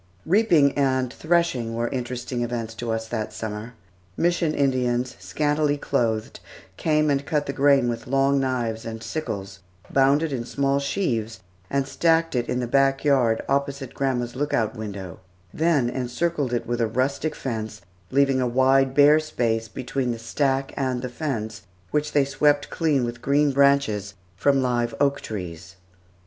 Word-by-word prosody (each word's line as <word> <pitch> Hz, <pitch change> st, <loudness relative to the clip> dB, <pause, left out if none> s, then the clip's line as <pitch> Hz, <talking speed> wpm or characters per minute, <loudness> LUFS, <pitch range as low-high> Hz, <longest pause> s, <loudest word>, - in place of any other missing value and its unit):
Reaping 170 Hz, -8 st, +4 dB
and 130 Hz, -2 st, +1 dB
threshing 155 Hz, -9 st, 0 dB
were 120 Hz, +1 st, -1 dB
interesting 125 Hz, -1 st, -4 dB
events 115 Hz, -2 st, -3 dB
to 115 Hz, 0 st, -4 dB
us 110 Hz, 0 st, -2 dB
that 110 Hz, -2 st, -3 dB
summer. 110 Hz, +2 st, -6 dB, 0.4 s
Mission 170 Hz, -2 st, +1 dB
Indians, 125 Hz, -2 st, 0 dB
scantily 145 Hz, +9 st, 0 dB
clothed, 110 Hz, -5 st, -1 dB, 0.4 s
came 150 Hz, -, +2 dB
and 140 Hz, 0 st, 0 dB
cut 145 Hz, 0 st, -1 dB
the 140 Hz, -, -3 dB
grain 140 Hz, -3 st, +4 dB
with 115 Hz, -1 st, -3 dB
long 135 Hz, +1 st, +2 dB
knives 120 Hz, -4 st, -1 dB
and 115 Hz, 0 st, -6 dB
sickles, 100 Hz, -11 st, -5 dB, 0.3 s
bound 140 Hz, +3 st, +4 dB
it 155 Hz, -3 st, -2 dB
in 120 Hz, -3 st, -2 dB
small 140 Hz, +3 st, 0 dB
sheaves, 115 Hz, -, -2 dB, 0.3 s
and 140 Hz, -1 st, 0 dB
stacked 165 Hz, +2 st, +2 dB
it 120 Hz, -2 st, -1 dB
in 125 Hz, -, 0 dB
the 125 Hz, -, -1 dB
back 135 Hz, +3 st, +2 dB
yard 125 Hz, -6 st, +3 dB
opposite 140 Hz, -1 st, -1 dB
grandma's 125 Hz, -3 st, -1 dB
lookout 125 Hz, -5 st, 0 dB
window, 100 Hz, -5 st, -7 dB, 0.3 s
then 155 Hz, -6 st, +2 dB
encircled 130 Hz, +3 st, -1 dB
it 120 Hz, -, -1 dB
with 120 Hz, 0 st, -2 dB
a 115 Hz, -, +2 dB
rustic 135 Hz, +6 st, -1 dB
fence, 110 Hz, -4 st, -5 dB, 0.3 s
leaving 135 Hz, -1 st, +3 dB
a 125 Hz, -, +1 dB
wide 130 Hz, +2 st, +3 dB
bare 145 Hz, +2 st, +7 dB
space 115 Hz, -7 st, -1 dB
between 130 Hz, +1 st, -3 dB
the 120 Hz, -, -2 dB
stack 135 Hz, +4 st, -1 dB
and 130 Hz, -2 st, -1 dB
the 125 Hz, -, -3 dB
fence, 110 Hz, -7 st, -4 dB, 0.2 s
which 150 Hz, 0 st, 0 dB
they 145 Hz, -2 st, +3 dB
swept 145 Hz, +1 st, +1 dB
clean 150 Hz, -6 st, +1 dB
with 120 Hz, 0 st, -4 dB
green 145 Hz, +1 st, +2 dB
branches 135 Hz, -8 st, +2 dB, 0.2 s
from 135 Hz, +7 st, +2 dB
live 120 Hz, -2 st, 0 dB
oak 140 Hz, -1 st, +2 dB
trees. 90 Hz, -3 st, -7 dB
130 Hz, 160 wpm, -24 LUFS, 115-140 Hz, 0.4 s, bare